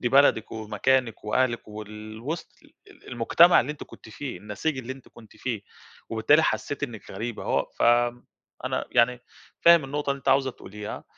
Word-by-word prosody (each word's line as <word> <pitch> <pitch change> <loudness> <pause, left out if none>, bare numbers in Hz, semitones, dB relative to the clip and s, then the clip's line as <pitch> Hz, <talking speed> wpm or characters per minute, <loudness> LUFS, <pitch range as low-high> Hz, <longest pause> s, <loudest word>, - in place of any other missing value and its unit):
دي 120 - +1
بلدك 135 -4 +4
ومكانك 115 +2 0
وأهلك 120 +1 0
وال 110 +1 -9
وِسط 160 +7 -5
ال - - -22 0.2
ال - - -18
المجتمع 125 +9 +5
اللي 145 +5 -3
أنتِ 150 - -11
كنتِ - - -14
فيه، 130 +4 -6
النسيج 105 +8 -3
اللي 130 +1 -5
أنتِ 135 -1 -14
كنتِ 110 -2 -17
فيه، 115 -6 -3 0.5
وبالتالي 115 +8 +4
حسّيتِ 140 +5 -1
إنِّك 115 -7 -6
غريبة. 110 +4 -5
هو - - +1
ف - - -1 0.8
أنا، - - -1
يعني، 120 +1 +3 0.4
فاهم 170 -3 +7
النقطة 145 +1 -2
اللي 140 - -1
أنتِ - - -5
عاوزة 135 0 +4
تقوليها. 105 -3 -8
120 Hz, 170 wpm, -26 LUFS, 110-140 Hz, 0.8 s, فاهم